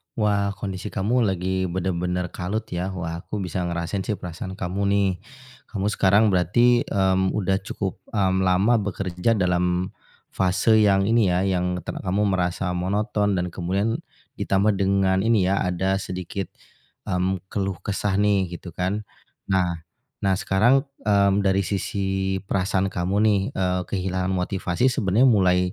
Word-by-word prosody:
Wah. 100 -2 +1
Kondisi 95 -3 -5
kamu 115 +5 +1
lagi 95 0 -1
bener-bener 90 0 -2
kalut 100 +5 -3
ya. 90 +1 -2
Wah, 85 -1 -4
aku 105 +4 -5
bisa 90 0 -3
ngerasain 85 +3 -3
sih 105 - -1
perasaan 90 +1 -7
kamu 95 0 -3
nih. 100 -1 +3 0.6
Kamu 100 -1 -2
sekarang 100 +2 +4
berarti, 120 +7 +3
mmm, 95 -1 +1
udah 95 -2 +1
cukup, 95 -3 -4
mmm, 95 -3 +2
lama 100 +6 +3
bekerja 100 +1 -1
dalam 90 -1 0 0.4
fase 100 +4 +3
yang 95 -1 +4
ini 115 -3 +4
ya 90 - +1
yang 90 -2 0
te - - -9
kamu 95 +2 -2
merasa 90 0 -1
monoton 105 +2 0
dan 90 -1 -1
kemudian 95 +6 -1 0.4
ditambah 100 +1 +1
dengan 95 0 +2
ini 105 -5 +3
ya, 100 - +2
ada 95 +2 0
sedikit, 95 0 -4 0.6
mmm, 95 0 0
keluh 95 -2 -1
kesah 100 -1 -1
nih, 100 -2 +2
gitu 90 0 -9
kan? 95 +5 -2 0.5
Nah 90 -3 +1 0.4
nah 95 -1 +1
sekarang, 100 +8 +3 0.2
mmm, 100 -1 +3
dari 95 0 +3
sisi 95 0 -1
perasaan 95 0 0
kamu 90 +2 -2
nih, 105 -2 +4
eee, 90 -1 0
kehilangan 95 0 -2
motivasi 95 +5 0
sebenarnya 115 +2 +3
mulai 95 -4 +4
95 Hz, 145 wpm, -24 LUFS, 90-100 Hz, 0.6 s, sekarang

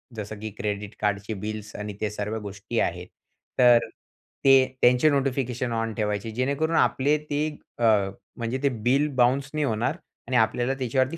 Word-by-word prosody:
जसं 105 0 -6
की 110 +1 -5
क्रेडिट 105 0 -3
कार्डचे 105 +1 -1
बिल्स 110 -1 -6
आणि 105 0 -5
ते 105 - 0
सर्व 105 +1 -3
गोष्टी 100 -1 -4
आहेत. - - -1 0.5
तर, 120 -1 +7 0.7
ते 135 0 +8 0.3
त्यांचे 125 +5 +5
नोटिफिकेशन 130 -3 -1
ऑन 115 -1 -1
ठेवायचे 105 0 -2
जेणेकरून 140 +6 0
आपले 145 +3 +3
ते, 150 +1 0 0.3
अ, - - -1 0.5
म्हणजे 120 +2 -2
ते 140 - +4 0.2
बिल 135 +4 +3
बाउन्स 130 +3 +2
नाही 150 -1 0
होणार. 120 +6 -1 0.3
आणि 130 -1 +1
आपल्याला 120 +3 +2
त्याच्यावरती 130 +4 0
120 Hz, 155 wpm, -25 LUFS, 105-135 Hz, 0.7 s, ते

